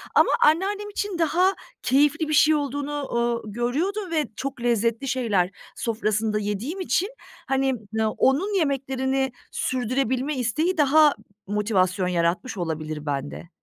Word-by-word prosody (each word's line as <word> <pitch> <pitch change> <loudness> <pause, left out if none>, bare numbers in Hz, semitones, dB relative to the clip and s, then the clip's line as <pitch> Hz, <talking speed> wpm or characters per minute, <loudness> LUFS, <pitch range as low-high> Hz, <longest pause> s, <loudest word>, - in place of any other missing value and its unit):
Ama - - +5
anneannem 395 +6 +2
için 405 -2 -3
daha 350 +4 +3 0.3
keyifli 295 +5 +3
bir - - 0
şey 300 +1 +5
olduğunu, 285 0 -2
ooo, 235 -2 -1
görüyordum 330 - -1
ve 310 -2 +1
çok 270 0 -5
lezzetli 235 +1 +1
şeyler 220 -9 +1 0.3
sofrasında 215 -1 -1
yediğim 210 - -3
için, 375 +1 0 0.4
hani, 270 0 +1 0.2
n 220 0 +1
onun 285 - +1
yemeklerini 270 -2 0 0.2
sürdürebilme 260 +3 -1
isteği 310 +10 0
daha 300 0 +5 0.3
motivasyon 195 -3 +1
yaratmış 180 +7 0
olabilir 155 -3 -4
bende. 145 +3 -4
265 Hz, 125 wpm, -24 LUFS, 215-305 Hz, 0.4 s, Ama